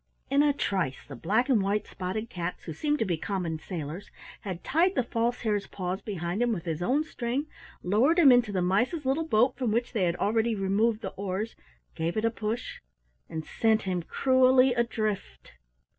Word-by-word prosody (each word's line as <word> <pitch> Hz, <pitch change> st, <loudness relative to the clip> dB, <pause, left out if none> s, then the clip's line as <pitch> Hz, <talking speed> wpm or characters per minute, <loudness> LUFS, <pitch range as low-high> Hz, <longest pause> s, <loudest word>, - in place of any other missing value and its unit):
In 280 Hz, +1 st, +5 dB
a 295 Hz, 0 st, +4 dB
trice 190 Hz, -, -2 dB
the 140 Hz, -, -8 dB
black 210 Hz, -, +1 dB
and 250 Hz, -7 st, +3 dB
white 200 Hz, +2 st, 0 dB
spotted 195 Hz, +4 st, -4 dB
cats, 175 Hz, -4 st, -5 dB
who 160 Hz, -, -6 dB
seemed 295 Hz, -, 0 dB
to 225 Hz, -, 0 dB
be 175 Hz, -4 st, -1 dB
common 170 Hz, -3 st, -3 dB
sailors, 165 Hz, +2 st, -6 dB, 0.3 s
had 185 Hz, -4 st, -6 dB
tied 350 Hz, +5 st, +2 dB
the 255 Hz, -, +2 dB
False 235 Hz, +1 st, -1 dB
Hare's 210 Hz, -3 st, -1 dB
paws 185 Hz, +1 st, -4 dB
behind 180 Hz, 0 st, -3 dB
him 245 Hz, -1 st, +2 dB
with 185 Hz, -7 st, -3 dB
his 165 Hz, -1 st, -3 dB
own 265 Hz, +11 st, +2 dB
string, 260 Hz, -1 st, -3 dB, 0.4 s
lowered 235 Hz, -, +3 dB
him 300 Hz, -6 st, +8 dB
into 245 Hz, -3 st, +4 dB
the 185 Hz, -3 st, 0 dB
mice's 245 Hz, -, +1 dB
little 295 Hz, +5 st, 0 dB
boat 240 Hz, 0 st, +3 dB
from 250 Hz, -4 st, 0 dB
which 235 Hz, +3 st, -1 dB
they 205 Hz, -6 st, +1 dB
had 170 Hz, 0 st, 0 dB
already 225 Hz, +4 st, +1 dB
removed 210 Hz, +3 st, +1 dB
the -, -, -4 dB
oars, 200 Hz, +3 st, -3 dB, 0.4 s
gave 165 Hz, +5 st, -2 dB
it 215 Hz, -, +1 dB
a 230 Hz, -, +2 dB
push, 225 Hz, +1 st, -4 dB, 0.5 s
and 160 Hz, -1 st, -5 dB
sent 220 Hz, -1 st, +1 dB
him 185 Hz, -2 st, -1 dB
cruelly 260 Hz, +5 st, +4 dB
adrift! 225 Hz, -4 st, -2 dB
215 Hz, 190 wpm, -28 LUFS, 185-245 Hz, 0.5 s, him